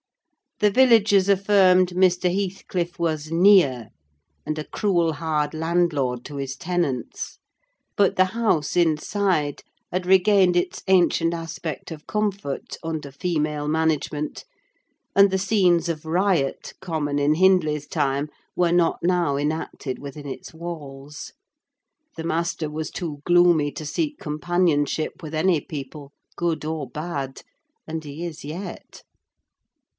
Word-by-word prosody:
The 210 -1 +4
villagers 220 -5 +5
affirmed 190 -2 +4
Mr. 180 0 +2
Heathcliff 185 -3 -3
was 155 -2 -2
near, 165 - +4 0.6
and 155 - -3
a - - -3
cruel 170 -3 0
hard 155 -2 -1
landlord 155 -7 0
to 145 - -7
his 135 -1 -4
tenants; 165 -6 -3 0.6
but 200 -2 +3
the 185 - +5
house, 185 -8 0
inside, 165 -1 +1 0.3
had 180 0 -2
regained 190 -1 +5
its 175 - -1
ancient 175 -3 +3
aspect 165 -2 -6
of 155 -2 -9
comfort 200 -8 -3
under 160 -3 -4
female 150 -1 -2
management, 150 -1 -1 0.7
and 200 0 +7
the 190 - 0
scenes 185 -4 +2
of 155 -2 -3
riot 170 -4 0
common 155 -6 -2
in 145 +2 +3
Hindley's 155 -5 +3
time 140 +1 -1 0.3
were 175 -1 +2
not 175 -1 +3
now 175 -5 +1
enacted 145 -3 -3
within 145 +1 -8
its 135 - -7
walls. 150 -4 -8 0.8
The 160 - -4
master 165 -1 -1
was 155 +1 -4
too 155 -6 -6
gloomy 175 -4 +4
to 155 - -7
seek 300 - -2
companionship 155 -1 0
with 155 0 -7
any 170 +1 +2
people, 140 0 -8 0.2
good 170 -3 -1
or 155 -3 -3
bad; 140 -2 -5 0.5
and 160 0 -4
he 150 +3 -6
is 160 -2 -7
yet. 165 +7 -8
165 Hz, 125 wpm, -23 LUFS, 150-180 Hz, 0.8 s, and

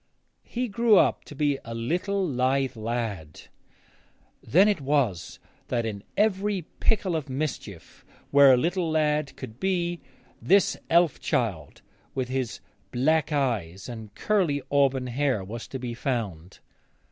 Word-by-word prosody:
He 245 +1 -2
grew 225 0 +4 0.3
to 145 - -11
be 145 -1 +1
a 115 -1 -7
little 180 - -1
lithe 130 -1 0
lad. 110 -8 -4 1.0
Then 190 +7 +4
it 205 -7 +1
was 130 - 0 0.3
that 120 -2 -1
in 100 -3 -5
every 205 -2 +1 0.2
pickle 200 -6 +1
of 150 -3 -3
mischief 130 - -5 0.3
where 140 -1 +8
a 130 - +6
little 170 +5 0
lad 150 -2 +1
could 110 +3 -9
be 175 -2 -1 0.4
this 195 +2 +4
elf 170 -2 +3
child, 95 - -2 0.3
with 130 -2 -2
his 130 -3 -3 0.3
black 155 +6 +1
eyes 105 - -1
and 110 -3 -9
curly 175 -10 +1
auburn 135 -2 +2
hair, 125 -3 0
was 110 +4 -7
to 135 - -5
be 125 -2 -5
found. 105 - -4
135 Hz, 135 wpm, -26 LUFS, 115-170 Hz, 1.0 s, where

